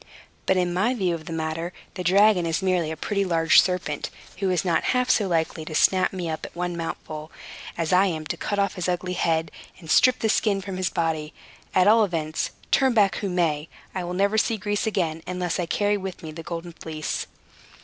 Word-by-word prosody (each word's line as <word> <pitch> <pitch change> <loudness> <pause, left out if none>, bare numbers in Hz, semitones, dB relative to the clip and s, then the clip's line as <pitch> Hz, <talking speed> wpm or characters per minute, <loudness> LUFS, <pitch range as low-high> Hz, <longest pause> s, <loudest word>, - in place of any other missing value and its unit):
But, 190 - +3
in 180 -1 +1
my 215 +8 +1
view 185 -6 0
of 160 -2 -6
the - - -7
matter, 165 +2 -3 0.2
the 180 - -5
dragon 190 0 +4
is 165 +3 -1
merely 180 -4 +1
a 160 - -4
pretty 200 +5 -1
large 165 -3 +5
serpent, 180 -6 -2 0.3
who 195 -2 0
is 185 +1 0
not 165 -3 +1
half 250 0 +3
so 205 - +2
likely 165 -2 -1
to 155 - -6
snap 185 +4 +4
me 180 -3 -4
up 160 -1 -4
at - - -8
one 175 0 -2
mouthful 155 -2 -6 0.5
as 165 +1 0
I 190 +2 +5
am 160 -4 -3
to - - -3
cut 205 - -3
off 200 -1 +1
his 180 0 -2
ugly 180 0 -1
head, 160 -2 0 0.3
and 160 -3 -6
strip 255 -1 +5
the 220 - 0
skin 205 -2 +2
from 195 -1 -6
his 185 -1 0
body. 160 -3 -2 0.4
At 185 +1 +5
all 220 +1 +6
events, 160 -5 -1 0.2
turn 265 -3 +3
back 200 -3 +4
who 200 - -2
may, 165 -4 0 0.2
I 185 - -3
will 175 +1 -4
never 200 +3 +2
see 225 0 +1
Greece 205 +2 -1
again, 165 -6 -1
unless 180 -1 -2
I 175 - -1
carry 205 +3 +1
with 190 -3 -7
me 160 - -6
the 165 +2 -8
Golden 170 +1 -6
Fleece." 155 -2 -4
180 Hz, 220 wpm, -25 LUFS, 165-195 Hz, 0.5 s, all